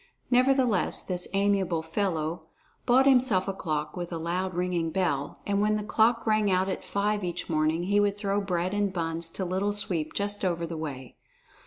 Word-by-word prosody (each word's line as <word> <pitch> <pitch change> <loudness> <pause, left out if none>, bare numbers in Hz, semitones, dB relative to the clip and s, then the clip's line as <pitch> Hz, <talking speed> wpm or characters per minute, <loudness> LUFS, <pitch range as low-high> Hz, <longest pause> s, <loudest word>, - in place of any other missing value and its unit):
Nevertheless 250 -5 +3
this 180 -1 -4
amiable 195 -4 +1
fellow 160 -2 -2 0.4
bought 260 +2 +5
himself 250 -8 +4
a 195 - -1
clock 155 -5 -3
with 175 -1 -5
a 170 - -3
loud 180 +3 -2
ringing 175 -2 0
bell, 160 -5 -1
and 200 0 +1
when 215 0 +2
this 210 -1 -3
clock 225 +1 +2
rang 215 -2 +2
out 185 0 +2
at 190 - -3
five 205 0 -1
each 175 -1 -3
morning, 155 +2 +1
he 200 +3 +2
would 205 0 +1
throw 205 0 0
bread 180 -1 -1
and 205 -1 +1
buns 165 -2 -3
to 185 +3 -4
Little 190 +3 0
Sweep 170 -6 -1
just 205 0 -2
over 170 -2 0
the 165 0 -5
way. 140 -5 -6
185 Hz, 185 wpm, -27 LUFS, 165-205 Hz, 0.4 s, bought